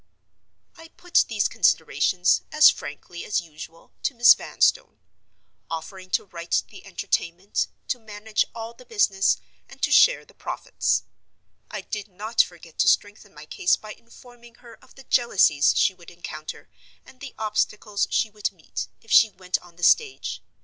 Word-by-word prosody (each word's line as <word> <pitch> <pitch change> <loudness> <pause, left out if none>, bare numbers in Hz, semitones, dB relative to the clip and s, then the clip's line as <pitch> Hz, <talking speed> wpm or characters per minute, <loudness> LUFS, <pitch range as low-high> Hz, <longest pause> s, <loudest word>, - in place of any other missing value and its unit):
I 325 - -13
put 355 +1 +1
these 215 -3 +1
considerations, 180 -1 +2
as 305 0 +7
frankly 170 +4 -9
as 210 - 0
usual, 165 0 -12
to 275 - -1
Miss 240 +1 +8
Vanstone; - - 0 0.7
offering 185 +3 -7
to - - 0
write 170 -3 -2
the - - -13
Entertainment, 175 +4 -2 0.2
to 250 - -1
manage 215 -1 -2
all 230 0 -7
the 245 - -16
business, 205 -5 +2 0.3
and - - -14
to - - +2
share - - +5
the - - -21
profits. - - -2 0.7
I - - -5
did 210 -1 -6
not 215 +4 +1
forget 170 -2 -9
to - - +3
strengthen 205 0 +1
my 150 +1 -11
case 175 - +1
by 215 0 -10
informing 240 +1 -18
her 235 -1 -15
of - - -21
the 270 - -14
jealousies 185 - +3
she 195 - +3
would 175 -2 -15
encounter, 155 -3 -9 0.4
and 255 - -18
the 280 -1 -9
obstacles 210 -1 -1
she 220 - 0
would 210 -1 -3
meet, 175 -5 -7 0.2
if 225 - -14
she 225 - +7
went 185 -2 -3
on 175 -1 -19
the 175 - -13
stage. 440 - +2
205 Hz, 160 wpm, -24 LUFS, 175-235 Hz, 0.7 s, Miss